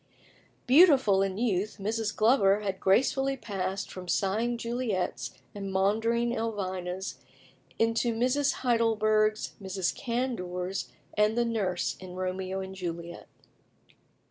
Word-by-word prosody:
Beautiful 265 - +6
in 195 -1 -1
youth, 210 -3 0
Mrs. 215 +1 -2
Glover 210 -3 +4
had 195 -2 -3
gracefully 270 +7 +2
passed 195 -4 -4
from 185 -1 -8
sighing 220 +7 0
Juliets 235 -5 -2 0.2
and 195 -1 -5
maundering 225 +5 +1
Elvinas 190 -4 -3 0.6
into 230 +1 +2
Mrs. 255 +6 +1
Heidelbergs, 215 -3 +2
Mrs. 190 -1 -1
Candours, 195 -7 -3 0.3
and 210 +2 +2
the 240 - +3
Nurse 200 -6 -1
in 185 -1 -9
"Romeo 185 +1 -3
and 190 0 -7
Juliet." 170 -2 -6
210 Hz, 110 wpm, -29 LUFS, 190-235 Hz, 0.6 s, Beautiful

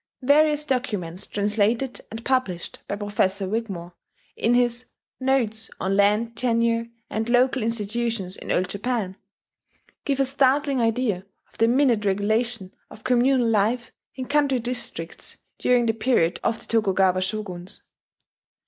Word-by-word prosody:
Various 300 +2 +4
documents 210 - -2
translated 215 +5 0
and 225 +2 -8
published 250 -10 -1
by - - -2
Professor 200 -1 0
Wigmore, 190 -5 -4 0.4
in 235 +2 +2
his 245 0 +1 0.3
"Notes 240 -5 0
on 190 +1 0
Land 210 +3 +2
Tenure 230 -1 +1 0.2
and 220 +2 -2
Local 255 +2 +3
Institutions 225 -3 -2
in - - -6
Old 185 - +1
Japan," 200 -1 -2 0.9
give 275 -2 -1
a 270 - +4
startling 275 0 +2
idea 225 -4 0 0.3
of - - -23
the 225 - +5
minute 245 -3 +3
regulation 205 +1 0 0.2
of 215 - -14
communal 255 0 +3
life 225 +2 +1 0.2
in 260 0 -4
country 285 -1 +2
districts 235 -9 -4 0.2
during 245 -1 +3
the 225 - +2
period 220 -7 +1
of 225 - 0
the - - -11
Tokujawa 195 -4 +2
Shoguns. 185 -2 -4
230 Hz, 130 wpm, -24 LUFS, 200-250 Hz, 0.9 s, the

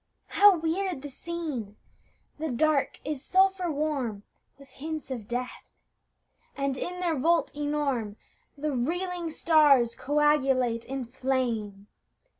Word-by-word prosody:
How 405 -2 +6
weird 330 -1 -2
the 290 - -7
scene! 290 -11 -5 0.6
The 315 0 -2
Dark 285 +3 +1
is 295 -2 -4
sulphur 380 -1 +3
warm 280 -9 -2 0.3
With 275 0 -16
hints 305 +1 -6
of 230 -5 -5
death; 245 +1 -5 0.8
and 275 -1 0
in 360 +6 -5
their 340 -3 +1
vault 330 +4 +1
enorme 290 -8 -1 0.4
The 300 +1 -2
reeling 345 +6 -2
stars 295 -7 +4
coagulate 270 -5 +2
in 270 -1 -4
flame. 235 -5 -2
285 Hz, 115 wpm, -28 LUFS, 255-320 Hz, 0.8 s, How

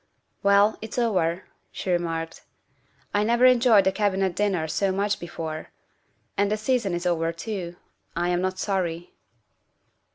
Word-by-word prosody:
" - - -49
Well, 200 +2 +4
it's 220 +2 -7
over," 190 -7 +1 0.3
she 185 - -4
remarked. 165 -2 -2 0.4
" - - -38
I 205 - +2
never 235 +3 +3
enjoyed 240 -5 +6
a 190 - +4
Cabinet 190 -3 0
dinner 190 -6 0
so 195 +4 0
much 200 +2 0
before. 160 -2 -6 0.7
And 200 0 +1
the 215 - +1
season 215 -4 0
is 175 +1 -4
over 165 -2 +1
too. 175 0 -5 0.4
I 175 +1 0
am 175 0 +1
not 185 0 -2
sorry. 175 -4 -2
190 Hz, 155 wpm, -25 LUFS, 175-210 Hz, 0.7 s, enjoyed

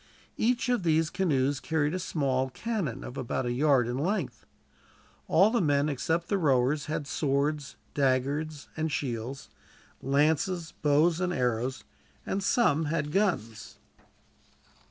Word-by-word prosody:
Each 235 +1 +1
of 245 -4 +1
these 160 -2 +2
canoes 140 -7 +1
carried 155 -1 0
a 185 - -1
small 135 -7 0
cannon, 195 - -3
of 125 - -8
about 130 0 -2
a 120 - -1
yard 135 -1 +3
in 120 +2 -2
length. 170 - -2 0.8
All 190 +7 +5
the 235 - +2
men, 145 -2 +2
except 165 +5 -1
the 200 - 0
rowers, 140 -1 +2
had 150 -1 -3
swords, 140 +1 -1 0.2
daggers, 140 +3 0
and 160 0 -2
shields, 130 0 -4 0.5
lances, 160 +5 +1
bows, 155 +3 +3
and 180 -1 0
arrows, 125 -2 -1 0.4
and 195 - -2
some 180 - +2
had 150 -1 -1
guns. 150 - -1
150 Hz, 135 wpm, -28 LUFS, 135-170 Hz, 0.8 s, All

